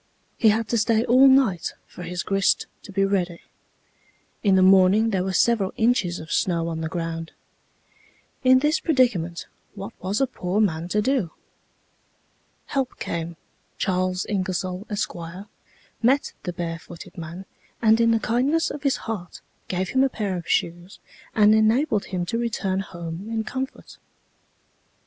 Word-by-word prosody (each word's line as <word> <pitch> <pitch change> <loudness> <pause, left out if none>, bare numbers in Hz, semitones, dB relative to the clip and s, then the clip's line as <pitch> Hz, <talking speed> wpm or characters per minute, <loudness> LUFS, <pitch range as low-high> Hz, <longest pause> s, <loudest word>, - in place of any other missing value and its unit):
He 220 - +4
had 220 +1 +1
to 235 - +2
stay 225 +1 +2
all 255 +3 +6
night 260 -10 +3
for - - -12
his 175 0 -4
grist 195 -1 +2 0.2
to - - -11
be 195 0 +2
ready. 180 -3 -1 1.0
In 195 -3 +4
the 185 - +5
morning 195 +4 +5
there 190 -3 0
were 190 - -2
several 200 0 +2
inches 220 -7 +2
of 160 - -9
snow 170 -2 +1
on 160 -1 -4
the 160 - -3
ground. 165 -1 -4 1.1
In 260 0 +6
this 305 +2 +2
predicament 215 - +1 0.3
what 200 +3 -7
was 190 +3 -1
a 270 - +4
poor 200 -6 -2
man 170 -5 +1
to 210 +3 0
do? 255 -8 +1 1.4
Help 270 -2 -2
came; 170 0 -4 0.4
Charles 185 -1 0
Ingersoll, 185 0 -2
Esq., 205 -1 -2 0.9
met 265 +5 +2
the 180 - -4
barefooted 170 -1 -7
man, 170 +3 -8 0.3
and 225 0 +4
in 230 - +4
the 225 -1 +3
kindness 260 +10 +1
of 290 - -6
his 275 -2 +2
heart, 205 -6 -5 0.3
gave 185 0 -2
him 265 0 +3
a 270 - +3
pair 205 -6 -3
of 175 -2 -6
shoes 175 +3 -1 0.4
and 215 0 +6
enabled 220 +1 +2
him 180 -2 -3
to 230 +6 -2
return 205 -5 -1
home 170 0 -6
in 225 -1 -1
comfort." 265 +5 -6
195 Hz, 155 wpm, -24 LUFS, 180-230 Hz, 1.4 s, all